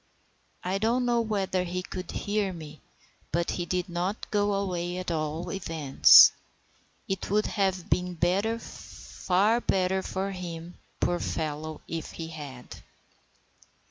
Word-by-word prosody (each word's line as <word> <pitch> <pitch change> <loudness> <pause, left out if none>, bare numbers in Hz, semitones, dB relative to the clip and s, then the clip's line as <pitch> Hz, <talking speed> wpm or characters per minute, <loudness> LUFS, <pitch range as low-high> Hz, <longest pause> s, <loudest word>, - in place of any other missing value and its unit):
I 185 +2 -1
don't 235 +4 +1
know 240 -1 +2
whether 195 -4 -1
he 180 +1 -3
could 185 0 -7
hear 205 -1 -1
me, 155 -3 -10 0.5
but 170 0 0
he 175 -1 -3
did 180 +1 -1
not 180 +4 -3
go 205 -1 +2
away 180 -3 -2
at 185 -1 -3
all 160 +2 -2
events. 160 -7 +7 0.8
It 195 0 -3
would 210 +2 +2
have 190 -3 -1
been 180 -1 -1 0.4
far 210 0 -1
better 190 -2 +1
for 190 +1 -3
him, 175 -2 -7 0.3
poor 175 - +1
fellow, 155 0 -3
if 165 -1 -5
he 165 -1 -6
had. 140 -6 -9
180 Hz, 130 wpm, -28 LUFS, 165-195 Hz, 0.8 s, events